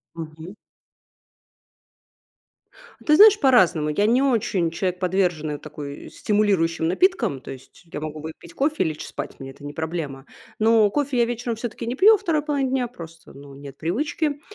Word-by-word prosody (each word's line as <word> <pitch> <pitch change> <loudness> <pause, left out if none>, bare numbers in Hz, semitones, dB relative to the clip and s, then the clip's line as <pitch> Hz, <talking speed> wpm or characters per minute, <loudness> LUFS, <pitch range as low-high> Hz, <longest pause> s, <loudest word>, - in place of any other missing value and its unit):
Мгм. 160 +3 -9 2.5
Ты 305 0 +5
знаешь, 425 +1 +8
по-разному. 185 - +4
Я 175 +7 +1
не 245 +4 +3
очень 200 -10 +1
человек, 180 +1 -2
подверженный, 175 -5 0
такой, 145 -2 -9
стимулирующим 190 -6 +1
напиткам. 230 - +1
То - - -10
есть, 135 +6 -13
я - - -5
могу 155 0 -6
выпить 160 +2 -10
кофе 300 +3 0
и - - +1
лечь 155 -1 -5
спать, - - -7
мне 135 0 -7
это 145 - -16
не 145 - -6
проблема. 155 -4 -5 0.3
Но 220 -1 +4
кофе 285 -2 -1
я 235 - +5
вечером 240 -1 -3
все-таки 230 0 -6
не 240 - -2
пью 410 +10 +6
во 425 - +4
2 330 -7 0
половине 285 -3 -1
дня, 255 -2 0
просто 165 -7 -12
ну 140 0 -13
нет 140 0 -11
привычки. 290 - -2
185 Hz, 165 wpm, -23 LUFS, 155-255 Hz, 2.5 s, знаешь